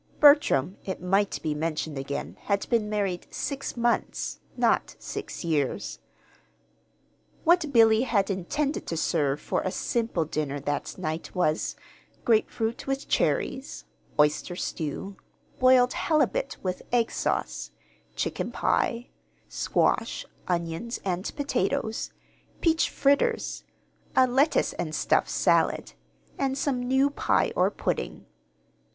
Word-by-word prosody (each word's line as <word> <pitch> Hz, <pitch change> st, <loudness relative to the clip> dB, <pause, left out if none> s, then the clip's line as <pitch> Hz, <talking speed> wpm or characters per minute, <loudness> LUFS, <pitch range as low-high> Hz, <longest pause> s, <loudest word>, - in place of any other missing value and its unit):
Bertram, 285 Hz, -, +5 dB
it 190 Hz, -, -4 dB
might 195 Hz, +3 st, +1 dB
be 155 Hz, -, 0 dB
mentioned 155 Hz, 0 st, -2 dB
again, 85 Hz, -, -4 dB
had 200 Hz, 0 st, 0 dB
been 225 Hz, -3 st, +2 dB
married 200 Hz, -4 st, -1 dB
six 275 Hz, -3 st, -4 dB
months, 235 Hz, 0 st, 0 dB, 0.2 s
not -, -, +2 dB
six -, -, -6 dB
years. 150 Hz, -5 st, -1 dB, 1.4 s
What 340 Hz, -3 st, +4 dB
Billy 225 Hz, -3 st, +6 dB
had 215 Hz, -6 st, +1 dB
intended 275 Hz, -, -2 dB
to 165 Hz, -, -2 dB
serve 145 Hz, -4 st, +1 dB
for -, -, -1 dB
a -, -, -1 dB
"simple 225 Hz, -4 st, -1 dB
dinner" 150 Hz, -2 st, -2 dB
that 145 Hz, +1 st, -3 dB
night 160 Hz, +1 st, -4 dB
was: 160 Hz, -3 st, +1 dB, 0.5 s
grapefruit 225 Hz, +1 st, +1 dB
with 270 Hz, 0 st, -2 dB
cherries, 265 Hz, +1 st, 0 dB, 0.3 s
oyster 150 Hz, +4 st, +2 dB
stew, 180 Hz, +4 st, -4 dB, 0.4 s
boiled 255 Hz, -1 st, +5 dB
halibut 335 Hz, +11 st, +1 dB
with 185 Hz, -1 st, -2 dB
egg 235 Hz, -2 st, +2 dB
sauce, -, -, -2 dB, 0.5 s
chicken -, -, -2 dB
pie, 235 Hz, +1 st, 0 dB, 0.4 s
squash, -, -, 0 dB, 0.2 s
onions, 170 Hz, +6 st, -2 dB
and 185 Hz, 0 st, -1 dB
potatoes, 280 Hz, -5 st, -1 dB, 0.5 s
peach 325 Hz, -1 st, +3 dB
fritters, 285 Hz, -, +1 dB, 0.5 s
a 260 Hz, -, +7 dB
"lettuce 265 Hz, +5 st, +2 dB
and -, -, -3 dB
stuff" -, -, +2 dB
salad, -, -, +2 dB, 0.5 s
and 270 Hz, -1 st, 0 dB
some 275 Hz, -2 st, 0 dB
new 265 Hz, +3 st, +2 dB
pie -, -, +1 dB
or -, -, +4 dB
pudding. -, -, -3 dB
220 Hz, 115 wpm, -27 LUFS, 165-265 Hz, 1.4 s, a